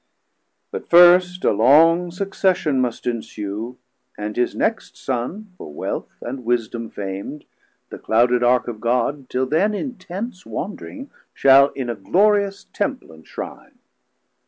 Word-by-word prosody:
But -, -, -7 dB
first 180 Hz, +1 st, +6 dB
a -, -, +4 dB
long 165 Hz, -, +4 dB
succession 180 Hz, -6 st, 0 dB
must 125 Hz, -2 st, -3 dB
ensue, 110 Hz, 0 st, -5 dB, 0.4 s
330 105 Hz, -, -6 dB
And 105 Hz, -, -5 dB
his 125 Hz, -, 0 dB
next 225 Hz, +1 st, -2 dB
Son 175 Hz, -, -4 dB
for 75 Hz, -, -9 dB
Wealth 75 Hz, -, -6 dB
and 125 Hz, +1 st, -6 dB
Wisdom 115 Hz, -1 st, -2 dB
fam'd, 100 Hz, +9 st, -6 dB, 0.5 s
The -, -, -8 dB
clouded 120 Hz, +2 st, +2 dB
Ark 125 Hz, +1 st, +3 dB
of 110 Hz, -3 st, -6 dB
God 125 Hz, +3 st, -1 dB
till 130 Hz, +1 st, 0 dB
then 185 Hz, +10 st, +1 dB
in 255 Hz, +2 st, -5 dB
Tents 185 Hz, +2 st, -7 dB
Wandring, 270 Hz, +7 st, -7 dB, 0.2 s
shall 135 Hz, 0 st, +6 dB
in 130 Hz, -3 st, -4 dB
a 120 Hz, -, -2 dB
glorious 200 Hz, -, +1 dB
Temple -, -, -3 dB
enshrine. 80 Hz, 0 st, -10 dB
135 Hz, 135 wpm, -21 LUFS, 120-185 Hz, 0.5 s, first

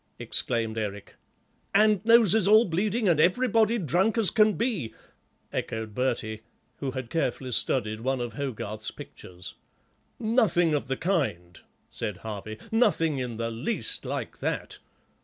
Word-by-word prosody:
exclaimed 115 Hz, -2 st, -2 dB
Eric. 105 Hz, -2 st, -5 dB, 0.6 s
"And 210 Hz, -3 st, +4 dB
noses 220 Hz, -3 st, +5 dB
all 215 Hz, +3 st, +7 dB
bleeding 205 Hz, +6 st, 0 dB
and 165 Hz, -4 st, +3 dB
everybody 225 Hz, +5 st, +3 dB
drunk 190 Hz, -, +1 dB
as 220 Hz, -4 st, +4 dB
can 215 Hz, -1 st, +4 dB
be," 180 Hz, -, -2 dB, 0.6 s
echoed 110 Hz, -1 st, -3 dB
Bertie, 110 Hz, -3 st, -2 dB, 0.4 s
who 140 Hz, -, -3 dB
had 130 Hz, -2 st, -6 dB
carefully 135 Hz, -5 st, -1 dB
studied 110 Hz, -2 st, 0 dB
one 130 Hz, +3 st, -1 dB
of 120 Hz, -2 st, -4 dB
Hogarth's 110 Hz, -5 st, -4 dB
pictures. 90 Hz, -1 st, -9 dB, 0.6 s
"Nothing 215 Hz, -8 st, +2 dB
of 145 Hz, -2 st, -1 dB
the 135 Hz, 0 st, -2 dB
kind," 130 Hz, -, -1 dB, 0.3 s
said 105 Hz, -4 st, -4 dB
Harvey, 110 Hz, 0 st, -7 dB
"nothing 185 Hz, -, +2 dB
in 125 Hz, -3 st, -4 dB
the 115 Hz, 0 st, -2 dB
least 115 Hz, +1 st, -1 dB
like -, -, -5 dB
that. -, -, -3 dB
140 Hz, 135 wpm, -27 LUFS, -, 0.6 s, all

